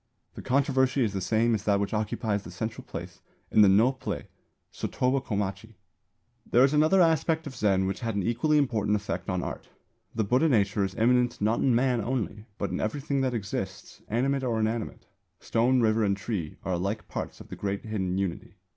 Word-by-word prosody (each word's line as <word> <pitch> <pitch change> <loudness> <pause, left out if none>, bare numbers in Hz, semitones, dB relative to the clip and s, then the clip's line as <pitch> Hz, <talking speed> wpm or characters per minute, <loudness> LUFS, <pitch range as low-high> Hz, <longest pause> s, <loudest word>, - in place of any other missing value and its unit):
The - - -8
controversy 130 0 +2
is 105 -3 -1
the 95 - -2
same 115 +5 +2
as 110 - -1
that 100 -1 +3
which 100 +1 -2
occupies 105 -1 -1
the 90 - -10
central 110 +5 -5
place - - -8 0.3
in 110 - +5
the 105 - +8
Nō 115 +7 +4
play - - -4 0.5
Sotoba 130 +1 0
Komachi. 105 0 -3 0.7
There 120 +2 +4
is 135 +2 +4
another 155 +5 +4
aspect 160 0 +1
of 135 -3 -7
Zen 100 -5 +2
which 95 - -2
had 115 -3 -3
an 100 - 0
equally 120 - +2
important 110 -7 +1
effect 95 -3 -3
on 90 -1 -1
art. - - -6 0.5
The 110 - +1
Buddha 130 +10 +3
nature 100 -5 +2
is 95 -1 -3
immanent 120 +1 +2
not 110 +3 +1
in 130 -3 +3
Man 125 -1 +2
only, 110 -4 -3
but 100 - -2
in - - -2
everything 140 +5 -1
that 130 -2 0
exists, 95 -2 -5
animate 135 +4 0
or 120 -3 0
inanimate. 110 +1 -2 0.3
Stone, 125 +3 +2
river 110 0 +3
and 100 -1 +1
tree 95 -7 -4
are 95 - -1
alike 100 +5 -2
parts - - -5
of - - -12
the - - -6
great 100 +1 -3
hidden 95 -4 -2
Unity. 100 +3 -3
110 Hz, 195 wpm, -27 LUFS, 100-130 Hz, 0.7 s, the